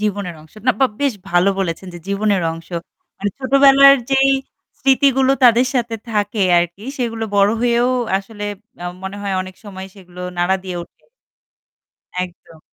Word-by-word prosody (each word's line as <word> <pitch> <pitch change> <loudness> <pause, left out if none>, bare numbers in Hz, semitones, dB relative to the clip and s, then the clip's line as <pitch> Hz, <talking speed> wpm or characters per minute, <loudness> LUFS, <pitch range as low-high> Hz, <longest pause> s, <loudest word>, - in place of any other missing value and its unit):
জীবনের 200 -4 -2
অংশ। 155 - -19
না, - - +6
বা 265 - +6
বেশ 280 -2 +2 0.2
ভালো 175 +2 +3
বলেছেন 185 0 -3
যে - - -7
জীবনের 200 -2 +1
অংশ। 165 0 -11 0.5
মানে 205 +1 -1
ছোটবেলার 275 +1 +6
যেই 270 0 +4 0.5
স্মৃতিগুলো 270 -1 +3
তাদের 245 +1 +6
সাথে 240 -2 0 0.2
থাকে 210 0 -1 0.2
আরকি 175 +3 -2 0.2
সেগুলো 230 -2 -2
বড় 200 +1 +5
হয়েও 240 0 +2 0.3
আসলে 205 +1 -8 0.4
আ - - -5 0.2
মনে 190 +1 -6
হয় 200 -1 -2
অনেক 185 0 -10
সময় 190 -2 -8
সেগুলো 180 -2 -13 0.2
নাড়া 180 +2 +2
দিয়ে 180 -2 -5
ওঠে। - - -18 1.2
একদম। 175 -2 -15
205 Hz, 150 wpm, -19 LUFS, 185-255 Hz, 1.2 s, না